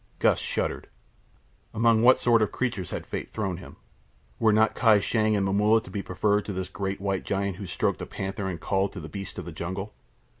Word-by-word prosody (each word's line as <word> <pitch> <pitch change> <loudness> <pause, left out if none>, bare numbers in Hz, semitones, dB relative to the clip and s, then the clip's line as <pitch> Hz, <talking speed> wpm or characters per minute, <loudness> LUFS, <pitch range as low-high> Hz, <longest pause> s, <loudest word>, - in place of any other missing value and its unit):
Gust - - +3
shuddered. - - -2 0.9
Among 115 0 +4
what 125 +2 +7
sort 115 -2 +3
of 110 - +1
creatures 110 -8 -2
had - - -5
fate - - -5
thrown 95 -5 -2
him? 90 - -11 0.6
Were 110 - +4
not 110 +1 +4
Kai 110 -4 +5
Shang 110 +1 +1
and 100 -1 +1
Momulla 105 +3 +4
to - - -12
be 100 - -3
preferred 105 +3 +1
to 100 - -4
this 95 0 -4
great 95 +1 -3
white 95 -1 -1
giant 100 -2 -2
who 100 - -6
stroked - - -1
a - - -5
panther 95 +1 -4
and 85 -3 -5
called 95 +4 0
to 95 - -6
the 80 - -7
beasts 100 +4 -7
of 90 - -5
the 85 - -6
jungle? 95 +6 -5
100 Hz, 215 wpm, -27 LUFS, 95-110 Hz, 0.9 s, what